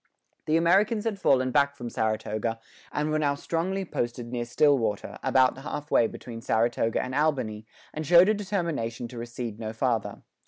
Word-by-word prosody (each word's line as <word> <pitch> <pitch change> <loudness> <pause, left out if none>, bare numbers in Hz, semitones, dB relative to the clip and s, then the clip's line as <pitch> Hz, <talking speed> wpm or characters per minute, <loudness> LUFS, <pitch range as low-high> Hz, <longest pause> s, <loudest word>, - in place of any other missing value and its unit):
The 155 +1 +3
Americans 200 +6 +3
had 220 -3 -2
fallen 130 -7 +3
back 140 +1 +2
from 120 -3 -7
Saratoga, 110 +1 -1 0.3
and 150 +1 -1
were 155 - +1
now 145 -2 +1
strongly 185 +6 -2
posted 120 -5 -3
near 120 -1 -2
Stillwater, 120 -4 +1
about 130 0 +3
half 150 +2 -6
way 115 - +4
between 115 0 -9
Saratoga 115 0 +1
and 130 - -3
Albany, 130 -8 0 0.3
and 155 - -4
showed 175 +4 +7
a 215 - +4
determination 170 - -2
to 120 - -8
recede 120 -2 -6
no 110 -1 -4
farther. 115 -2 -1
130 Hz, 165 wpm, -27 LUFS, 115-160 Hz, 0.3 s, showed